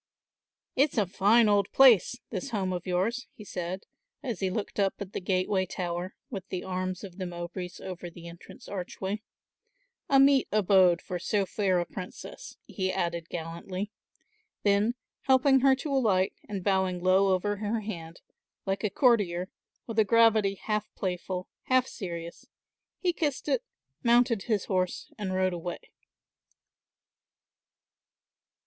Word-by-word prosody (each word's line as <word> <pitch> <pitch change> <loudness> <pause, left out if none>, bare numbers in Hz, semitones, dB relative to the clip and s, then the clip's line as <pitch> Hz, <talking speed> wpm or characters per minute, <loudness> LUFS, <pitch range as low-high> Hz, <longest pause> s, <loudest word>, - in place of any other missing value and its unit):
"It's 275 0 +2
a 210 - +4
fine 210 +5 +4
old 205 -2 +3
place, 245 -5 +6 0.2
this 190 -5 -3
home 190 -4 -1
of 180 +1 -5
yours," 205 +8 0
he 210 - -11
said, 185 0 -4 0.4
as 235 -9 -3
he 190 - 0
looked 205 +2 -4
up 195 -1 +2
at 200 -1 -7
the - - -3
gateway 185 +1 +1
tower, 175 +1 -4 0.2
with 195 -4 -5
the 185 - -3
arms 185 0 -3
of 190 -1 -9
the 185 - -2
Mowbrays 175 +1 -6
over 180 -1 -6
the 170 0 -11
entrance 170 0 -12
archway; 195 +2 -4 0.9
"a 275 - +6
meet 275 -1 +5
abode 190 -4 +4
for 180 - -4
so 200 +2 0
fair 190 -2 +1
a 175 - -1
princess," 190 - -9
he 185 -1 -2
added 170 -2 -2
gallantly; 175 +4 -5 0.7
then 205 +3 +3 0.3
helping 265 +1 +5
her 265 0 +5
to 275 +2 -4
alight 200 -8 +2 0.2
and 195 -3 -4
bowing 190 -2 +1
low 190 +1 +4
over 205 +3 +1
her 215 +2 -1
hand, 170 -6 -7 0.4
like 195 +2 -1
a 210 - +2
courtier, 195 -6 +2 0.4
with 225 -1 -2
a - - +7
gravity 220 -2 +4
half 210 +1 -2
playful, 185 0 -3 0.2
half 255 0 +3
serious, 170 -8 -7 0.5
he 360 -2 0
kissed 295 -5 -2
it, 270 -4 +2 0.4
mounted 235 -2 +4
his 215 -5 0
horse 185 -2 -1
and 190 -3 -2
rode 185 -1 +2
away. 175 0 -4
195 Hz, 145 wpm, -29 LUFS, 180-220 Hz, 0.9 s, a